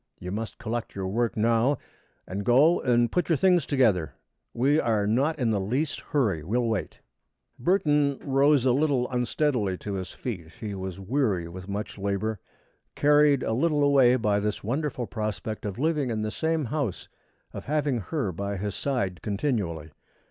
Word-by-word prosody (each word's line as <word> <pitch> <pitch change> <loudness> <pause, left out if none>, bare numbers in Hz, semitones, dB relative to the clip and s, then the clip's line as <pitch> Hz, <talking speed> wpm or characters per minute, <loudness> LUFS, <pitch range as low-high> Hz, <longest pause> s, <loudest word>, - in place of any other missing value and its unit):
You 90 - -6
must 110 +2 -4
collect 115 +1 -4
your 95 -1 -3
work 115 +4 -1
now 115 +5 +2 0.5
and 100 +3 -4
go 140 - +4
and 120 -2 +2
put 180 -2 0
your 165 - +4
things 180 -1 +3
together. 100 - +2 0.4
We 140 +6 +2
are 110 -6 +1
not 135 +10 +1
in 120 -5 +1
the 105 - +1
least 130 +11 -1
hurry. 105 - 0
We 105 +9 -1
will 120 -1 +1
wait." 110 -3 -3 0.6
Burton 145 -2 +2
rose 140 -1 +3
a 130 - +4
little 135 -2 +2
unsteadily 125 -5 0
to 100 - -6
his 95 -1 -4
feet. 85 -10 -6
He 105 +4 -6
was 95 -1 -5
weary 100 -5 0
with 90 +3 -9
much 100 +1 -5
labor, 100 +2 -2 0.6
carried 145 -1 +4
a 110 - -1
little 150 +4 +2
away 135 -3 +5
by 105 -4 +1
this 105 0 -2
wonderful 130 +2 -2
prospect 110 0 -4
of 100 - -5
living 150 -1 0
in 110 -2 -2
the 110 - -2
same 160 +1 -1
house, 115 - -3 0.5
of - - -7
having 145 -3 0
her 125 - -2
by 100 +3 -4
his 100 +1 -3
side 100 - -2
continually. 100 - -2
120 Hz, 170 wpm, -26 LUFS, 100-140 Hz, 0.6 s, away